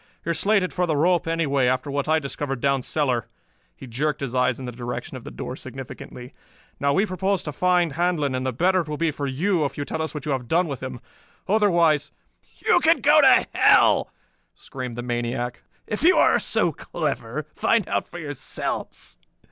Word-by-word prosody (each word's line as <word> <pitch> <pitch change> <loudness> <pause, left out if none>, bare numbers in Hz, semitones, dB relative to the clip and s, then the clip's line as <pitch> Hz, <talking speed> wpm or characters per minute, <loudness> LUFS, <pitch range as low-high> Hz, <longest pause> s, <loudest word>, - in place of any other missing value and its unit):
"You 170 - 0
are - - +1
slated 195 +3 +1
for 180 -1 0
the 155 - +1
rope 170 +2 +2
anyway, 145 -6 +1
after 130 +2 0
what 140 +1 -2
I 160 +1 +3
discovered 140 -2 -4
down 140 +1 +1
cellar." 125 -5 -1 0.5
He - - -11
jerked 145 +5 -2
his 135 -3 -3
eyes 125 -1 +1
in 130 - -6
the 125 - -5
direction 120 0 -6
of - - -9
the - - -6
door - - -6
significantly. 125 +2 -9 0.5
"Now 140 0 +2
we 195 +9 +2
propose 190 0 -1
to 150 - -4
find 180 +1 +2
Handlon, 165 -4 0
and 130 0 -2
the 130 - -1
better 180 +9 +2
it 155 - -8
will 150 - -3
be 165 0 +1
for 145 -1 -4
you 165 +6 0
if 140 - -3
you 145 - -3
tell 160 - -3
us 160 0 -4
what 150 - -5
you 150 - -1
have 130 -3 -2
done 170 +5 +2
with 140 -4 -5
him. 130 -2 -6 0.5
Otherwise...." 170 -7 +3 0.5
"You - - +5
can - - +3
go - - +6
to - - +6
hell!" - - +5 0.5
screamed 125 -3 -7
the 120 - -5
maniac. 120 0 -3 0.2
"If 210 - -4
you 360 +5 +5
are - - +5
so - - +1
clever, - - -4
find - - +1
out - - -1
for - - -10
yourselves. 145 - -4
145 Hz, 205 wpm, -24 LUFS, 130-170 Hz, 0.5 s, go